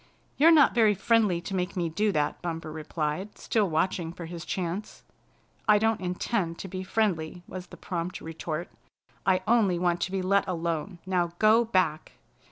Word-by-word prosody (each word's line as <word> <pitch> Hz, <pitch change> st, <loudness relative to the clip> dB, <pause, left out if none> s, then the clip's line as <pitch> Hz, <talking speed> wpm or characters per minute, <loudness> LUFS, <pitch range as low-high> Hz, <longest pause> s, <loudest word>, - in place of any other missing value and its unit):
"You're 315 Hz, +3 st, +6 dB
not 310 Hz, -4 st, +6 dB
very 220 Hz, -3 st, +4 dB
friendly 200 Hz, -3 st, +2 dB
to 195 Hz, -, -6 dB
make 180 Hz, +1 st, -2 dB
me 175 Hz, -2 st, 0 dB
do 205 Hz, +6 st, +1 dB
that," 150 Hz, -5 st, -1 dB
Bumper 165 Hz, -2 st, -4 dB
replied, 155 Hz, +4 st, -4 dB
still 210 Hz, -4 st, 0 dB
watching 165 Hz, +1 st, 0 dB
for 170 Hz, 0 st, -8 dB
his 170 Hz, 0 st, -7 dB
chance. 185 Hz, +3 st, -4 dB, 0.6 s
"I 210 Hz, -1 st, +7 dB
don't 225 Hz, 0 st, +1 dB
intend 180 Hz, -1 st, -1 dB
to -, -, -6 dB
be 185 Hz, 0 st, -5 dB
friendly," 180 Hz, -4 st, -1 dB
was 185 Hz, -1 st, -7 dB
the -, -, -12 dB
prompt 175 Hz, +1 st, -4 dB
retort. 160 Hz, +1 st, -5 dB, 0.6 s
"I 185 Hz, -1 st, +3 dB
only 215 Hz, -6 st, +3 dB
want 175 Hz, 0 st, 0 dB
to 185 Hz, -, -1 dB
be 190 Hz, -1 st, -1 dB
let 200 Hz, +2 st, +2 dB
alone. 170 Hz, 0 st, -2 dB
Now 175 Hz, -2 st, 0 dB
go 220 Hz, +3 st, +5 dB
back!" 185 Hz, -8 st, 0 dB
180 Hz, 175 wpm, -27 LUFS, 170-205 Hz, 0.6 s, I